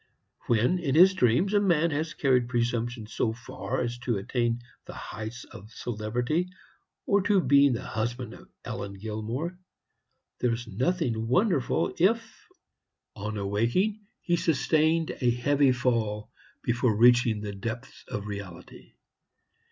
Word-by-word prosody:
When, 120 +10 +2
in 145 -5 -1
his 185 +4 +8
dreams, 150 - +2
a 205 - +5
man 170 -5 +2
has 155 +2 -2
carried 125 -4 +2
presumption 120 -1 -1
so 110 +1 -1
far 120 +2 -4
as 120 0 -3
to 120 -3 -1
attain 120 +3 0
to 120 - -16 0.2
the - - -9
heights 110 +3 -7
of 105 +2 -12
celebrity, 120 - -2 0.6
or 200 0 +3
to 200 0 +3
being 140 -3 +5
the 115 - -3
husband 120 +3 -3
of - - -14 0.2
Ellen 100 - -5
Gilmore, 110 - -4 0.8
there 125 - +2
was 115 +1 -3
nothing 120 - -1
wonderful 165 - +1
if, 225 +5 +1 0.7
on 105 +1 -4
awaking, 115 - 0 0.2
he 175 0 +1
sustained 160 +1 +2
a 125 - +3
heavy 135 +3 +3
fall 115 -4 -1 0.3
before 120 -2 +1
reaching 120 -2 +5
the 105 -1 -5
depths 110 +4 -6
of 105 -1 -4
reality. 100 -4 -9
120 Hz, 135 wpm, -27 LUFS, 110-160 Hz, 0.8 s, his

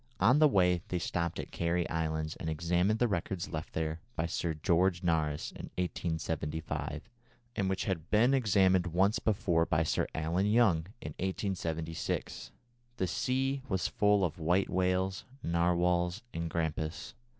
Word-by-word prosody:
On 125 +10 +5
the 155 - +7
way 90 - +3
they 90 - -1
stopped 85 0 -2
at - - -6
Cary 85 0 0
Islands 80 -1 -2
and 80 - -4
examined 85 +6 +1
the 120 - +2
records 95 -3 -2
left 80 -1 -5
there 80 0 -2 0.2
by 80 - 0
Sir 85 -1 -2
George 90 +3 +2
Nares 80 -3 0
in - - -8
1875, 80 -3 -3 0.5
and 100 -3 0
which 95 0 -1
had 85 -5 -3
been 115 +5 +4
examined 95 -7 +3
once 95 +5 +2
before 95 -6 +1
by 80 0 +2
Sir 80 - 0
Allen 85 +5 0
Young, 105 -7 +3
in 75 - -5
1876. 85 -4 -3 0.5
The 95 - +1
sea 135 +8 0
was 95 -2 0
full 105 -2 +3
of 85 0 -4
white 90 +4 +1
whales, 95 +1 0 0.2
narwhals, 85 +3 +1
and 85 0 -3
grampus. 80 0 -3
85 Hz, 150 wpm, -31 LUFS, 80-95 Hz, 0.5 s, the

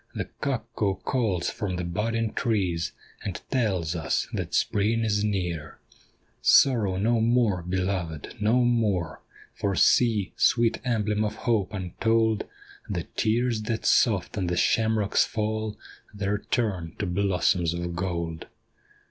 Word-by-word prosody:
The - - -2 0.2
cuckoo 110 -6 -1
calls 95 -2 -1
from 105 -6 -3
the 90 - -3
budding 110 +6 -1
trees, 95 -8 0 0.3
And 95 -4 -4
tells 95 - 0
us 80 -1 -1
that - - -3
Spring 110 +3 +1
is 105 -1 +1
near. 90 -7 -2 0.6
Sorrow 110 -9 +4
no 115 +4 +2
more, 115 -5 +2
beloved, 90 -3 -3
no 115 +4 +3
more! 105 -9 0 0.3
For 100 -1 -1
see, 110 -4 +3
sweet 115 -2 +2
emblem 110 -3 0
of 105 0 -2
hope 110 -6 +1
untold. 110 +3 0 0.4
The - - -2
tears 115 +1 +1
that 110 -1 -2
soft 100 -7 +3
on 90 - -1
the 90 0 -1
shamrocks 110 -1 +2
fall 110 0 -2 0.3
There 100 0 -2
turn 95 -9 -1
to 105 - -2
blossoms 90 -2 +1
of 85 0 -4
gold. 85 -3 -3
105 Hz, 130 wpm, -26 LUFS, 90-115 Hz, 0.6 s, Sorrow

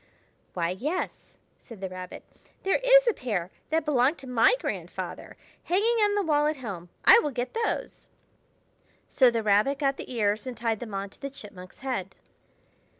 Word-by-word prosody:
"Why, 170 -1 0
yes," 295 - -4 0.2
said 230 -5 -13
the 190 - -3
Rabbit. 185 0 -8 0.4
"There 385 - +2
is - - +7
a 470 - +4
pair 195 - -3 0.2
that 320 0 +1
belonged 280 +1 +2
to 270 - -11
my 245 - +4
grandfather, - - -5 0.3
hanging 430 +7 +2
on 410 0 +2
the 410 - +1
wall 300 -3 +2
at 305 - 0
home. 195 -9 -7 0.2
I 470 - +9
will 300 - -1
get 250 -2 -4
those." 455 0 -3 1.0
So 255 -2 +5
the 230 -2 -1
Rabbit 215 +7 +3
got 275 -1 0
the - - -8
ears 215 0 0
and 250 -3 -5
tied 225 -2 -1
them 220 -4 -6
on 195 0 -4
to - - -22
the 275 - -4
Chipmunk's 195 -8 -12
head. 245 -9 -3
250 Hz, 175 wpm, -27 LUFS, 205-305 Hz, 1.0 s, I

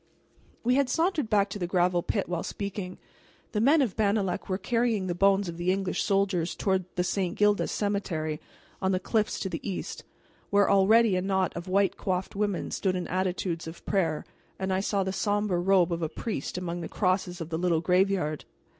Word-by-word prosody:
We 245 +2 +3
had 275 -1 +2
sauntered 325 - +1
back 205 -2 +3
to 205 - -5
the 175 - -2
gravel 180 -1 +2
pit 200 +3 -1
while 175 -1 -2
speaking. 200 -2 -5 0.5
The 210 - 0
men 285 +5 +5
of 225 -8 -2
Bannalec 200 -3 0
were 185 - 0
carrying 230 0 0
the 180 - -1
bones 195 +2 +3
of 170 -1 -6
the 175 +1 +1
English 190 -1 -1
soldiers 195 -4 +1
toward 190 -2 0
the 180 - +1
St. 180 0 -1
Gildas 210 0 +3
cemetery, 175 -7 -2 0.4
on 190 0 +1
the 185 - +1
cliffs 215 +2 0
to - - -1
the 170 -3 -4
east, 195 -3 -5 0.5
where 200 0 +4
already 205 +2 +5
a 185 - +1
knot 190 -1 0
of 170 +1 -6
white 195 +1 +2
coiffed 185 0 -2
women 205 -2 -1
stood 185 -2 0
in 180 - -3
attitudes 180 -2 -1
of 165 +1 -10
prayer; 165 -6 0 0.3
and 190 0 -1
I 185 - +1
saw 200 0 0
the 190 0 -2
somber 205 -2 0
robe 180 -2 +3
of 170 - -3
a 160 - -1
priest 180 - -4
among 175 -1 -3
the 165 - -5
crosses 185 -2 0
of 165 -1 -5
the 160 -1 -2
little 175 -2 +2
graveyard. 180 -3 +1
190 Hz, 200 wpm, -28 LUFS, 180-205 Hz, 0.5 s, men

